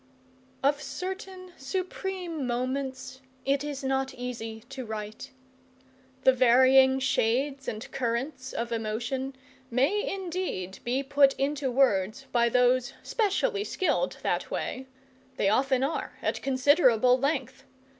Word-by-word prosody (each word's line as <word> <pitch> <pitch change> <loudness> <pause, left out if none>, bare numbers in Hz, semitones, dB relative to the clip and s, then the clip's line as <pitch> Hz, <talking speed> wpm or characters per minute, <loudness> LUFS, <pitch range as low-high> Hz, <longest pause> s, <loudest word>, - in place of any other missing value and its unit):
Of 285 +1 +2
certain 370 +5 -6
supreme 360 0 -4
moments 260 +1 -3 0.2
it 275 +1 +1
is 290 -1 -5
not 265 0 -1
easy 225 -3 -6
to 270 -1 -6
write. 215 +2 -6 0.9
The 260 - +6
varying 260 +1 +6
shades 265 +2 0
and 215 +2 -5
currents 260 +2 -2
of 235 0 -3
emotion 235 +4 -2 0.3
may 280 - +1
indeed 355 - -4
be 255 +3 0
put 275 0 +4
into 275 0 -1
words 240 -2 +2
by 235 -1 +3
those 250 +1 +3
specially 415 0 0
skilled 425 +4 0
that - - -1
way; 260 +1 -4 0.5
they 195 - +2
often 260 +4 +2
are, 285 +4 -3
at - - -1
considerable 255 -3 +4
length. 270 -2 -2
265 Hz, 115 wpm, -28 LUFS, 245-285 Hz, 0.9 s, The